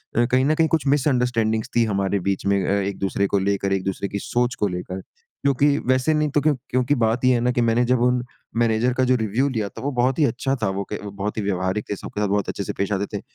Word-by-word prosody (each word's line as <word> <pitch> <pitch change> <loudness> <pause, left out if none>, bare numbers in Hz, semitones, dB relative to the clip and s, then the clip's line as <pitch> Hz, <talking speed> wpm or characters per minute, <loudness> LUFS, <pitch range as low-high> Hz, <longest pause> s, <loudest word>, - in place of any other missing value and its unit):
अ, 120 - +4
कहीं 130 +2 +2
न 155 - +2
कहीं 160 0 +3
कुछ 160 -3 0
मिसंडरस्टैंडिंग्स 125 -6 +1
थीं 120 -1 +4
हमारे 100 -1 0
बीच 100 - -2
में 100 -1 +2
अ, - - 0
एक-दूसरे 100 0 -1
को 100 - +1
लेकर, 100 0 0
एक-दूसरे 95 +1 -2
की 100 - -3
सोच 120 +4 -1
को 105 - 0
लेकर। 90 +1 -5 0.4
क्योंकि 140 +1 +3
वैसे 130 +4 +2
नहीं 150 0 +1
तो 145 +1 +1
क्यों 150 +1 +3 0.2
क्योंकि 130 +3 +1
बात 115 +3 +1
ये 130 - +5
है 120 - +2
ना 125 +1 +2
कि 120 - 0
मैंने 115 +1 +2
जब 125 0 +2
उन 125 0 +2 0.3
मैनेजर 115 +1 +2
का 130 +1 +1
जो 130 0 +3
रिव्यू 115 +4 0
लिया 110 -5 -2
था, - - -10
वो 140 +2 -2
बहुत 125 +3 +1
ही 150 - +5
अच्छा 135 +2 -1
था, 95 - +2
वो 100 +1 -2
क 105 - -2
वो 100 - -6
बहुत 100 +2 -4
ही 110 - 0
व्यवहारिक 95 +1 -1
थे, 105 - -1
सब - - -8
के 105 - -1
साथ 105 - +1
बहुत 100 0 0
अच्छे - - -3
से - - -4
पेश 100 +1 -1
आते 100 0 0
थे। - - -7
115 Hz, 270 wpm, -22 LUFS, 100-130 Hz, 0.4 s, ये